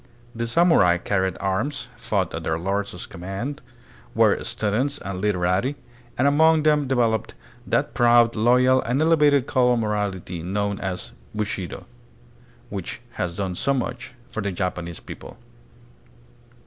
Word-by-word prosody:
The 115 -1 -3
samurai 120 - +4
carried 95 +1 -1
arms, 100 +9 -2
fought - - -1
at - - -4
their 80 0 0
lords' 95 +1 -3
command, 95 - -6 0.5
were - - +3
stu 105 -1 -1
dents 140 +7 0
and 95 -7 -6
literati, 95 +6 +1 0.4
and 130 - +3
among 160 +2 +4
them 150 -2 +3
developed 115 -4 0 0.3
that - - 0
proud, 120 -1 +4
loyal, 125 +3 +4
and 125 +4 -1
elevated 150 -4 +4
code 125 -3 +3
of 120 - +1
morality 100 -5 -2
known 100 +3 -2
as 95 -2 -4
" - - -21
Bushido," 100 -4 -4 0.9
which 100 +1 -5 0.2
has 85 -1 -2
done 95 -2 -2
so 140 +9 0
much 120 -1 -4 0.2
for 110 - -3
the 100 -1 -2
Japanese 90 -2 -3
people. - - -10
110 Hz, 140 wpm, -23 LUFS, 95-130 Hz, 0.9 s, samurai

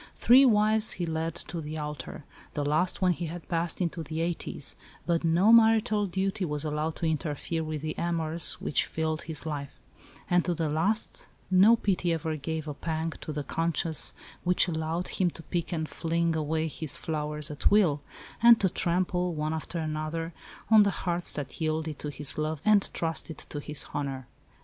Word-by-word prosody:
Three 260 +3 +6
wives 215 -2 +3
he 175 - -3
led 160 0 -2
to 165 +3 -6
the 155 +1 -6
altar 150 -1 -6 0.3
the 145 -2 -1
last 175 +6 +1
when 180 - +4
he 170 0 -5
had 165 -1 -8
passed 170 -1 -1
into 170 -2 -2
the 160 +1 -5
eighties 170 0 -2 0.3
but 170 -1 0
no 170 +6 +4
marital 220 -2 +4
duty 195 +2 -2
was 150 -2 -2
allowed 155 +1 -2
to - - -3
interfere 160 +1 -2
with 155 -1 -5
the 155 0 -2
amours 165 -1 +1
which - - 0
filled 160 -1 -2
his 160 -1 -4
life; 145 -3 -5 0.5
and 180 -1 +3
to 175 - 0
the 160 -1 -1
last 175 +9 0 0.2
no 195 +5 +7
pity 185 -5 0
ever 160 -1 -2
gave 155 +1 -4
a 150 - -3
pang 160 +2 -3
to - - -5
the 150 -1 -3
"conscience" 165 -1 +3 0.3
which 180 +1 +3
allowed 160 +1 -2
him 185 -2 0
to 165 - -12
pick 170 0 -3
and 160 -2 -2
fling 165 0 -1
away 160 +1 -1
his 155 -1 -1
flowers 150 -1 -2
at 150 - +1
will, 175 -9 +3 0.4
and 235 -1 +8
to 190 - +2
trample, 180 0 -1
one 155 +1 -2
after 160 +2 -5
another, 155 +1 -3 0.4
on 220 -1 +8
the 200 - +4 0.2
hearts 175 0 +3
that 145 +3 -6
yielded 155 -1 -2
to 150 - -4
his 145 0 +1
love 155 0 -2
and 210 -2 +4
trusted 165 -1 -3
to 145 - -7
his 150 0 +1
honour. 135 -2 -3
165 Hz, 185 wpm, -28 LUFS, 155-180 Hz, 0.5 s, and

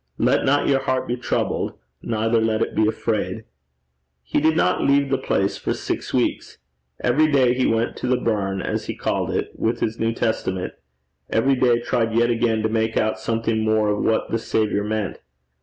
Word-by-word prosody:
Let - - +2
not 145 +2 +2
your 135 -1 +3
heart 130 -1 -1
be 120 - -1
troubled, 125 - -2 0.2
neither 115 0 0
let 110 0 +1
it - - -4
be 110 - +2
afraid.' 110 -1 -2 0.8
He 65 - 0
did 160 +1 +3
not - - +2
leave 140 0 +2
the 135 - +3
place 95 +1 0
for - - -2
six - - -4
weeks. - - -1 0.4
Every 150 +6 +3
day 130 -3 +4
he 125 0 +1
went 115 +1 0
to - - -3
the 125 0 +2
burn, 100 -5 -1
as - - -2
he - - -3
called - - -1
it, - - -2
with 115 +1 -1
his 110 +1 -2
New 115 0 +1
Testament; 95 -6 -2 0.6
every 130 +5 +2
day 125 -2 +3
tried 115 -2 0
yet 120 +1 +3
again 115 -2 +1
to - - +3
make 110 0 0
out 110 0 0
something 115 -1 -1
more 110 -1 +2
of 105 0 0
what 110 - 0
the 115 - 0
Saviour 110 -2 0
meant. 105 -2 -3
115 Hz, 190 wpm, -22 LUFS, 110-125 Hz, 0.8 s, day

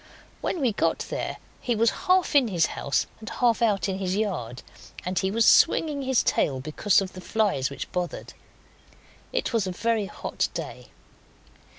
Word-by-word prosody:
When 345 - -2
we 250 -4 +3
got 205 - +1
there - - -3 0.2
he 240 - 0
was 230 +1 +3 0.2
half 365 -1 +3
in 275 -4 +6
his 175 -6 +2
house 140 - 0
and 220 - -8
half 240 -2 +1
out 210 -5 +2
in 190 0 -2
his 185 -1 -1
yard, 150 - -3 0.4
and 180 0 0
he 190 - 0
was 225 +3 +2
swinging 295 -3 +4
his 265 -2 +2
tail 135 -2 +1
because 155 +9 +2
of 190 -1 -5
the 185 - -9
flies 200 -11 0
which 140 - -7
bothered. 180 -2 -4 1.0
It - - -1
was 220 -4 +1
a - - -2
very 220 +2 0
hot - - -3
day. - - -6
205 Hz, 175 wpm, -26 LUFS, 180-230 Hz, 1.0 s, in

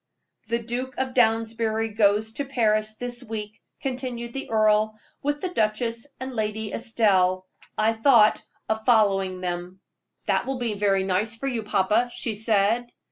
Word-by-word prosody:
"The 235 - +1
Duke 245 +3 -4
of 260 -1 -2
Downsbury 225 -1 +1
goes 210 0 +2
to 285 - -3
Paris 215 -5 +1
this 245 +1 -5
week," 215 -2 -6 0.2
continued 250 -3 -4
the 270 - -5
earl, 215 0 +2 0.2
"with 290 +1 -1
the 370 - -2
duchess 230 -3 -1
and 260 +1 -5
Lady 215 -1 -2
Estelle. 195 -6 +2 0.3
I 220 +1 +3
thought 225 -2 +5 0.3
of 220 0 -1
following 195 -6 +3
them." 180 +1 -4 0.5
"That - - +1
will 270 -1 -2
be 240 -3 -2
very 200 -2 +1
nice 195 +4 0
for 275 +4 -4
you, 245 -4 -1
papa," 210 +3 +1
she 230 - -2
said. 220 +2 +1
220 Hz, 150 wpm, -25 LUFS, 210-240 Hz, 0.5 s, thought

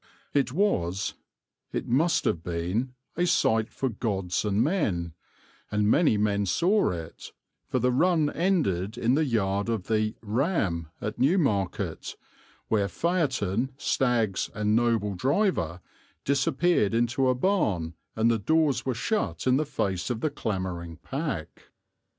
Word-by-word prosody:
It 140 -3 +2
was, 100 - 0 0.6
it - - -3
must 155 +8 +2
have 80 - +1
been, 90 +10 -2 0.2
a 175 +2 +1
sight 110 -8 +2
for 135 - -2
gods 100 -6 -2
and 105 +1 +2
men; 100 - 0 0.6
and 105 0 +1
many 150 -11 +4
men 100 -1 +1
saw 185 - +2
it; 85 -2 -7 0.4
for - - -1
the 125 +1 +2
run 155 +2 +2
ended 130 - 0
in 120 +2 +2
the 155 +3 +3
yard 100 -4 0
of 110 -5 -1
the 110 -1 0
"Ram" 105 - 0
at 105 - -4
Newmarket, 130 - 0 0.5
where 105 -3 +1
phaeton, 130 - 0
stags, 120 -8 +1
and 105 0 +1
noble 115 -3 +1
driver 110 - 0 0.4
disappeared 135 - +2
into 120 +3 +2
a 130 - +2
barn 110 - 0 0.2
and 115 +1 +3
the 115 - +1
doors 150 +1 +2
were 130 -2 -1
shut 110 - -1
in 130 0 +4
the 150 +1 -1
face 95 -8 -2
of 120 -2 -2
the 155 - 0
clamouring 90 -5 -4
pack. 135 - -5
115 Hz, 140 wpm, -27 LUFS, 95-140 Hz, 0.6 s, many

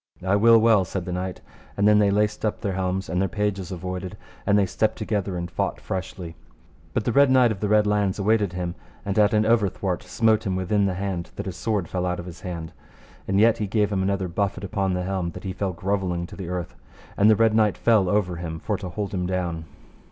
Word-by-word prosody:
I 95 +2 +3
will 115 +3 +6
well, 110 -3 +5
said 90 0 -4
the 90 - -4
knight, 90 +1 -4 0.4
and 100 +1 +3
then 105 0 +6
they 105 -1 +4
laced 105 +1 0
up 105 -1 -1
their 100 -3 -1
helms, 95 0 -2
and 90 +1 -1
their 95 - 0
pages 105 -3 -2
avoided, 90 0 -5 0.3
and 100 0 +4
they 100 - +4
stepped 110 +4 0
together 100 -4 -2
and 85 0 -5
fought - - -2
freshly; 90 -3 -5 0.6
but - - 0
the - - +1
Red 140 0 +5
Knight 130 -3 +5
of 100 - -4
the 105 - -1
Red 105 0 +4
Launds 105 -2 +1
awaited 105 -2 +2
him, 90 -1 -3 0.3
and 100 +1 0
at 105 0 +5
an 105 0 +3
overthwart 100 -5 +1
smote 110 -2 +1
him 95 - 0
within 100 +2 +1
the 95 - -2
hand, 95 -2 -3
that - - -5
his - - -5
sword 105 -6 -1
fell 90 +1 -2
out 90 0 -2
of 85 - -6
his 90 -1 -10
hand; 85 -3 -6 0.5
and 95 +1 +2
yet 115 +1 +4
he 105 - -1
gave 105 0 +1
him 95 - 0
another 95 0 0
buffet 100 +3 -2
upon 95 -1 -1
the 90 - -2
helm 95 -2 -2
that 90 - -9
he 95 - -4
fell 95 0 -2
grovelling 90 -1 -2
to - - -11
the 95 -4 -6
earth, 90 -2 -4 0.4
and 105 +2 +5
the 110 - +6
Red 115 0 +3
Knight 110 -2 +3
fell 110 -6 +3
over 90 -4 0
him, 80 -2 -5
for 105 +3 -2
to 95 -2 -6
hold 100 +2 -4
him 90 -2 -1
down. 90 -3 -2
95 Hz, 240 wpm, -24 LUFS, 90-105 Hz, 0.6 s, will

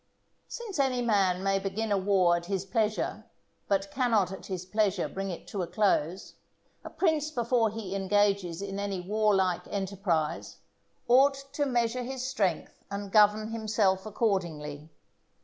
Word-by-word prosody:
Since 435 -9 -6
any 255 -3 +1
man 195 -5 +2
may 195 0 +2
begin 205 +3 -3
a 200 - +3
war 185 -3 +3
at 170 0 -4
his 195 -1 -2
pleasure, 215 +2 -1 0.4
but 195 0 0
cannot 225 -8 +2
at 190 - -8
his 185 -2 -4
pleasure 205 -1 +1
bring 195 0 -4
it 175 - -7
to 200 - -3
a 175 - -2
close, 185 -2 0 0.5
a - - -7
prince 315 -4 +1
before 240 -4 +1
he 210 -3 -6
engages 195 -2 +1
in 195 0 -4
any 200 -2 -2
warlike 190 -2 +1
enterprise 190 -6 -2 0.5
ought 270 +3 +5 0.2
to 290 0 0
measure 240 -1 0
his 255 +1 -4
strength 210 -10 -2
and 200 0 -5
govern 215 +1 +4
himself 210 -3 0
accordingly. 160 -9 -2
200 Hz, 150 wpm, -29 LUFS, 190-225 Hz, 0.5 s, ought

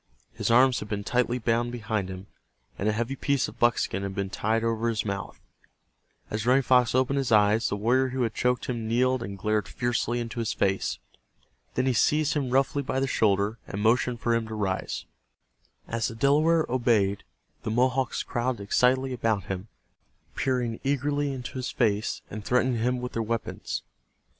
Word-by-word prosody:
His - - -2
arms 125 +2 +5
had 105 - -8
been 100 -1 -2
tightly 125 +2 +1
bound 120 0 0
behind 110 -5 -2
him, 95 +1 -7 0.5
and 105 - +1
a - - +3
heavy 120 +5 -2
piece 140 0 0
of - - -12
buckskin 120 -5 +2
had 100 -1 -4
been 100 -1 -2
tied 110 +2 0
over 115 0 0
his 110 -1 -1
mouth. 100 -1 -4 0.9
As 105 0 -2
Running 130 +2 +5
Fox 125 -1 +3
opened 130 +2 +2
his 130 -3 -2
eyes, 105 +1 +4
the - - -1
warrior 125 +6 +2
who 130 0 -1
had 115 -2 -1
choked 125 -1 0
him 115 -3 -3
kneeled 125 +2 +2
and 100 -4 -6
glared 105 0 0
fiercely 120 0 -1
into 120 0 -4
his 115 -2 -1
face. 95 0 0 0.8
Then 130 - +1
he 130 - +2
seized 150 +5 +2
him 140 -4 -1
roughly 135 +2 +2
by 130 -1 -2
the 135 - +1
shoulder, 105 -3 +1
and 100 - -5
motioned 120 +2 +2
for 120 - +1
him 115 -1 0
to 110 - -6
rise. 95 -3 -2 0.8
As 115 -1 -1
the 115 - -6
Delaware 155 +6 +3
obeyed 115 -6 +1 0.4
the - - -4
Mohawks 125 +3 +1
crowded 120 -3 -2
excitedly 130 +5 +2
about 115 -5 0
him, 95 +3 -5 0.7
peering 125 -3 -1
eagerly 145 +1 0
into 130 0 -6
his 130 - -3
face, 105 -3 0
and 105 0 -6
threatening 125 +1 +1
him 125 +1 0
with 125 - -4
their 115 - -1
weapons. 110 - -3
120 Hz, 180 wpm, -27 LUFS, 110-130 Hz, 0.9 s, arms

